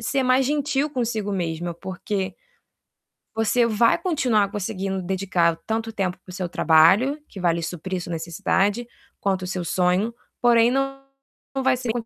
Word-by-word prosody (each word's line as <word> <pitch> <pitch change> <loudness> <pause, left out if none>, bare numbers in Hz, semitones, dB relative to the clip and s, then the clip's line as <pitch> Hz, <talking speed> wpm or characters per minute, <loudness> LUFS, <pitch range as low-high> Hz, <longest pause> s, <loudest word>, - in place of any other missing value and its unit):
ser 270 +4 0
mais 255 +1 +3
gentil 290 0 0
consigo 225 -7 -2
mesma, 170 -2 -2
porque 190 +2 -4 1.0
você 225 +2 +2
vai 230 +1 +3
continuar 255 - +1
conseguindo 195 -2 -3
dedicar 180 -2 +1
tanto 225 0 -2
tempo 190 -3 -2
para - - -12
o - - -10
seu 185 -2 -3
trabalho, 190 - +4
que 195 - -9
vai 175 -2 +2
lhe 170 - -3
suprir 180 +2 -4
sua 175 - -7
necessidade, 195 +7 0 0.4
quanto 190 -2 0
o - - -4
seu 180 -1 -3
sonho, 180 +6 +1 0.3
porém 235 -1 +5
não 270 +1 -1 0.5
não 270 - -1
vai 260 -1 +3
ser 245 -2 -2
200 Hz, 160 wpm, -23 LUFS, 180-240 Hz, 1.0 s, porém